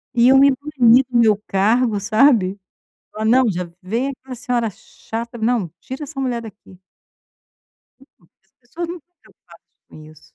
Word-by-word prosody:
Iam 250 +3 +5
me 280 0 +6
banir 260 -3 +3
do 240 - 0
meu 220 -3 +4
cargo 215 +3 +1
sabe? 210 -2 +2 0.5
Falar: 215 +1 -5
"Não 245 +2 +4
já 180 -2 -5
vem 230 +8 -2
aquela 260 -1 -10
senhora 240 -3 -2
chata, 230 +5 -8
não, 220 -5 0
tira 260 +3 -8
essa 290 -1 -11
mulher 245 -3 -2
daqui". 200 -4 -14 1.7
As 195 - -41
pessoas 320 +8 -7
não 345 - -5
estao 355 +3 -36
preocupadas - - -22 0.2
com - - -15
isso. 155 0 -17
235 Hz, 150 wpm, -19 LUFS, 210-260 Hz, 1.7 s, me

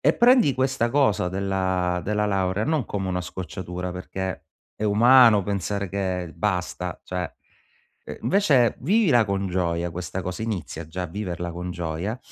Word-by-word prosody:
e - - +4
prendi 240 - +5
questa 130 -2 +1
cosa 120 -10 +2
della 95 -2 -1
della 105 +1 0
laurea, 95 +1 0
non 155 -5 0
come 95 -2 -3
una 90 0 -1
scocciatura, 90 0 -6
perché, 95 -1 -5 0.3
è 110 - -3
umano 115 0 +6
pensare 100 0 -2
che 90 -3 -3
basta, 90 -3 -2
cioè 90 -1 -3 0.9
invece 145 - +3
vivila 155 - +3
con 100 -1 -1
gioia 85 -1 -1
questa 90 +2 -5
cosa, 90 +4 -5
inizia 85 -7 -4
già 90 +3 -5
a - - -2
viverla 90 -2 -4
con 90 +1 -5
gioia 85 +6 -3
95 Hz, 145 wpm, -24 LUFS, 90-110 Hz, 0.9 s, umano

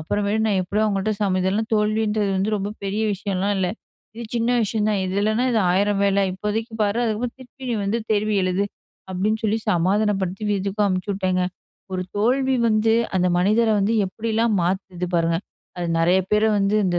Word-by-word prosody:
அப்புறமேட்டு 205 +6 -1
நான் 200 -3 +2
எப்படியோ 205 +4 -1
அவுங்கள்ட்ட 205 +1 0
சம 190 -2 +1
இதெல்லாம் 210 +5 0
தோல்வின்றது 210 -1 +1
வந்து 195 +3 0
ரொம்ப 200 0 -3 0.5
விஷயம்லா 195 0 -2
இல்ல. 185 -1 +1 0.5
இது 235 0 -7
சின்ன 230 +1 +1
விஷயம் 215 0 0
தான் 205 - 0
இதில்லனா 215 +5 +1
இது 225 - +3
1000 200 +2 +2
வேல. 200 0 +2
இப்போதைக்கு 210 +4 -3
பாரு, 205 +3 +1
அதுக்கப்புற 230 +2 -1
திருப்பியும் 245 -4 -5
வந்து 215 +4 0
தேர்வு 215 +1 +1
எழுது 185 +2 +1 0.5
அப்டின்னு 215 +4 -1
சொல்லி 215 +1 +1
சமாதானப்படுத்தி 195 +2 0
வீட்டுக்கும் 200 +1 0
அனுப்ச்சுவிட்டேங்க. 185 -1 -1 0.5
ஒரு 185 0 -1
தோல்வி 260 +5 +2
வந்து 220 +1 +3 0.2
அந்த 180 0 +2
மனிதர 215 +5 +3
வந்து, 200 +3 +1
எப்படிலாம் 225 +2 0
மாத்துது 180 0 -2
பாருங்க! 165 0 +2 0.4
அது 175 - -2
நெறைய 175 +3 +4
பேர 210 +1 +4 0.2
வந்து 200 +1 +1
இந்த 175 -1 +1
205 Hz, 160 wpm, -22 LUFS, 190-220 Hz, 0.5 s, நெறைய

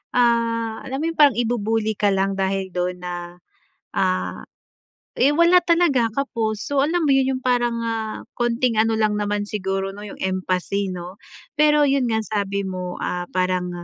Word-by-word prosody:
ah, 230 -2 +1
alam 265 0 -4
mo - - 0
yung 325 - -14
parang 285 -6 +6
i-bu-bully 225 -2 0
ka 205 - +2
lang 195 +1 +1
dahil 190 0 -1
do'n 180 0 -1
na, 180 0 -4 0.8
ah 90 -1 0 0.8
eh, 280 +3 +4
wala 340 +3 +5
talaga 330 -9 +3
kapos. 225 -5 -2
So, 285 -1 +1
alam 335 +1 0
mo 285 - +2
yon 265 -1 +2
yung - - -17
parang, 240 -2 +1
ah, 220 -1 -3 0.2
konting 240 -1 +1
ano 225 0 +2
lang 215 -1 +1
naman 205 0 -1
siguro 195 -1 -2
'no 205 +1 -9
yung - - -10
empathy 185 +1 -1
'no. 180 +2 -7 0.4
Pero 300 -1 +5
yon 270 -2 +2
nga 220 0 +1
sabi 200 -1 -2
mo, 180 -1 -5
ah, 180 0 -2
parang 185 -1 0
220 Hz, 170 wpm, -22 LUFS, 190-250 Hz, 0.8 s, parang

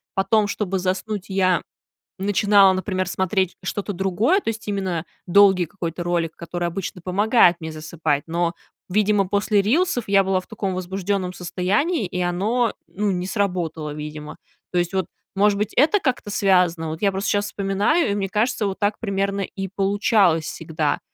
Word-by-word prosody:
потом, 205 +3 +3
чтобы 200 -2 -2
заснуть, 185 +2 -2
я 185 -2 +2 0.6
начинала, 200 0 +4
например, 185 -1 -2
смотреть 190 0 0
что-то 205 +2 -3
другое. 195 - +2
То - - -2
есть 220 -1 -6
именно 190 -5 -2 0.2
долгий 190 -1 +5
какой-то 170 0 -5
ролик, 170 -2 -1
который 175 +1 -4
обычно 180 +1 -5
помогает 200 0 +4
мне 160 -1 -6
засыпать. 155 -1 -2
Но, 170 +1 0 0.4
видимо, 205 0 +2
после 200 +1 +2
рилсов 255 - +1
я 195 0 +4
была 190 0 +1
в 185 - -11
таком 200 -4 -3
возбужденном 185 0 -2
состоянии, 195 - 0
и 180 +1 -3
оно, 210 +7 0
ну, 205 +2 -2
не 180 -1 -2
сработало, 180 -7 -2
видимо. 150 0 -7 0.3
То 180 - -1
есть 175 +1 -1
вот, 190 -2 0 0.3
может 200 +1 +3
быть, 210 +1 -2
это 315 +10 +4
как-то 255 - -2
связано. 180 -5 +2
Вот 160 +1 -6
я 200 - +3
просто 195 +2 -2
сейчас 205 0 +1
вспоминаю, 200 - +1
и - - 0
мне 195 -1 -2
кажется, 215 +1 0
вот 195 - -4
так 205 0 0
примерно 200 -1 -1
и 195 0 -4
получалось 195 -3 +2
всегда. 160 -2 -2
195 Hz, 165 wpm, -22 LUFS, 175-205 Hz, 0.6 s, долгий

